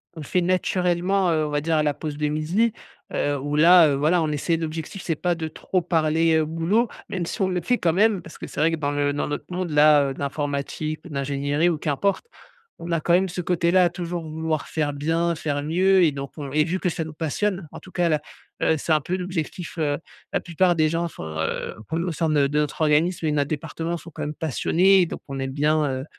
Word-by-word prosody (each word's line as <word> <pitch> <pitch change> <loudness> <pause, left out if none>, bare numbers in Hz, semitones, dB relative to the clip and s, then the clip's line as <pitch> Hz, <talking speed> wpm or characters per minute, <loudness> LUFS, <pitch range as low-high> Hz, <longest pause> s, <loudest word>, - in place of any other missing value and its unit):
on - - -8
le - - -7
fait 180 - +1
naturellement, 180 +1 +1
heu, 155 -1 +1
on 150 - -3
va 145 - 0
dire 165 +2 0
à 155 - +2
la 150 -1 +1
pause 150 -1 -6
de 150 0 0
midi, 170 +10 +1 0.4
heu, 145 0 0
où 145 +2 -3
là, 170 +1 +8
heu, 140 - +1
voilà, 155 +5 +2
on 155 - -1
essaie 155 +3 0
l'objectif, 160 +3 -5
c'est 165 - -1
pas 175 +1 0
de 160 -1 -4
trop 185 +3 -2
parler, 165 -1 +2
heu, 155 - +2
boulot, 165 +9 +1 0.2
même 180 -3 -2
si 200 - -5
on 190 - +2
le 180 -1 -1
fait 245 +9 +1
quand 170 - +2
même 205 0 +3
parce - - -12
que - - -7
c'est - - -7
vrai 165 - +4
que 165 - -1
dans 145 -2 -1
le 145 0 +1
dans 145 - -2
notre 145 - -3
monde, 180 0 -2
là, 150 -2 +5
de - - -13
l'informatique, 145 +2 -3
ou - - -9
de - - -9
l'ingénierie 140 +3 0
ou 165 - 0
qu'importe, 155 - -1 0.6
on 170 - -6
a 165 - +1
quand 170 - 0
même 185 +2 +4
ce 180 0 -4
côté-là, 180 +1 +3
à - - +2
toujours 175 -1 -4
vouloir 160 -1 -3
faire 150 -2 -1
bien, 165 +4 0
faire 145 -2 -2
mieux. 185 +5 +3
Et 160 - +4
donc 140 0 -6
on 140 -2 -5
et 150 0 +4
vu 180 +4 -2
que 185 - -1
ça 165 - -3
nous 155 -1 -8
passionne, 175 +4 -2
en - - -7
tout 185 - -15
cas 175 -1 +1
là, 155 -2 +1 0.4
heu, 160 - +3
c'est 155 +2 0
un 155 - +3
peu 180 +6 -2
l'objectif. 180 -1 -4
Heu, 145 -3 0 0.3
la - - +1
plupart 175 +1 +1
des 155 -1 +4
gens 170 +2 -1
sont, 80 - -9
heu, 80 - -2
p 160 - -1
au 175 +1 -1
sein 160 0 0
de 145 -2 +3
notre 150 0 -1
organisme 160 +3 +2
et 155 - +1
notre 145 -1 0
département 165 +2 -3
sont 170 +1 -11
quand - - -8
même 150 - -3
passionnés, 175 +5 +3
donc - - -6
on 135 -1 -5
aime 135 0 -3
bien, 150 +2 +2 0.2
heu, 135 - -8
160 Hz, 250 wpm, -24 LUFS, 150-175 Hz, 0.6 s, là